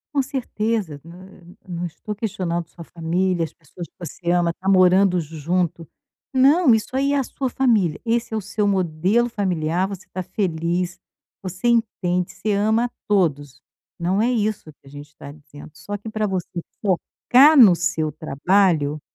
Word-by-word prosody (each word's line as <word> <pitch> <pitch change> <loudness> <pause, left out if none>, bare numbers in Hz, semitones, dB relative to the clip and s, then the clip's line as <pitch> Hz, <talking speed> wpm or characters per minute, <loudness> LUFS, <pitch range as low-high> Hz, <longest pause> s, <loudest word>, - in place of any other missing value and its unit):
Com 275 - +4
certeza, 225 - -3
nã 175 +3 -13 0.4
não 175 -1 -4
estou 210 +6 -7
questionando 180 -6 -3
sua 170 - -11
família, 175 +2 -1
as 160 - -4
pessoas 165 +2 -11
que - - -45
você 175 0 -6
ama, 175 -1 +2
está 185 +3 -4
morando 185 0 +4
junto, 165 +1 -2 0.4
não, 275 +2 +5
isso 220 +3 -4
aí 275 +1 +1
é - - +2
a 275 - +1
sua 260 +1 -4
família, 220 -11 +1
esse 230 0 0
é 220 - -1
o - - -2
seu 205 +1 -1
modelo 190 +4 +1
familiar, 185 -5 -1
você 195 -2 -8
está 185 - -6
feliz, 175 -1 -2 0.4
você 185 +4 -4
entende, 195 -6 0
você 215 - -3
ama 220 +3 +2
a - - -4 0.2
todos, 145 -10 0 0.4
não 185 +4 0
é 235 - +2
isso 215 -8 -2
que 140 - -32
a - - -16
gente 145 +1 -10
está 150 -1 -12
dizendo, 145 0 -14
só 200 +8 -6
que 205 - -12
para 215 -1 -1
você 180 -2 -4 0.2
focar 250 - +4
no 210 -9 +8
seu 165 -3 -1
trabalho 155 0 +1
185 Hz, 170 wpm, -22 LUFS, 165-215 Hz, 0.4 s, no